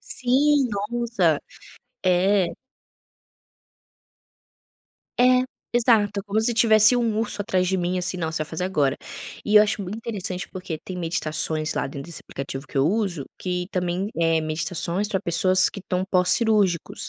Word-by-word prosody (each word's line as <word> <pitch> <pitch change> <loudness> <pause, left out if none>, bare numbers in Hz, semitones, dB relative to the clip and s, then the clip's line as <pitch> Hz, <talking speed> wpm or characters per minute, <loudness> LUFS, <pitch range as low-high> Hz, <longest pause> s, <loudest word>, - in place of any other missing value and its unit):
Sim, 275 +2 +1
nossa, 205 -5 0 0.6
é. 185 +1 +2 2.7
É. 255 0 +4 0.3
Exato, 210 -4 +2
como 210 +2 0
se 235 +1 0
tivesse 220 0 +6
um 225 -3 0
urso 210 -2 -1
atrás 185 -4 0
de 190 +1 0
mim, 180 +1 -1
assim: 180 +1 -1
"Não, 160 -2 -2
você 155 -1 -2
vai - - -16
fazer 165 +3 -3
agora". 145 -7 0 0.5
E 210 0 +3
eu 210 - +9
acho 210 -1 -1
muito 190 +4 -6
interessante 195 -5 -5
porque 180 -4 -6
tem 185 - -7
meditações 160 -2 -2
lá - - -1
dentro 140 0 -7
desse 170 - -8
aplicativo 135 0 -7
que 140 - -4
eu 135 - +3
uso 190 -7 -1
que 180 -1 -3
também 180 +1 -2
eh, 165 -1 +2
meditações 170 +5 -1
para 190 -3 -1
pessoas 185 +2 +3
que 200 - -9
estão 185 0 -2
pós-cirúrgicos 185 -1 +2
185 Hz, 150 wpm, -23 LUFS, 170-215 Hz, 2.7 s, eu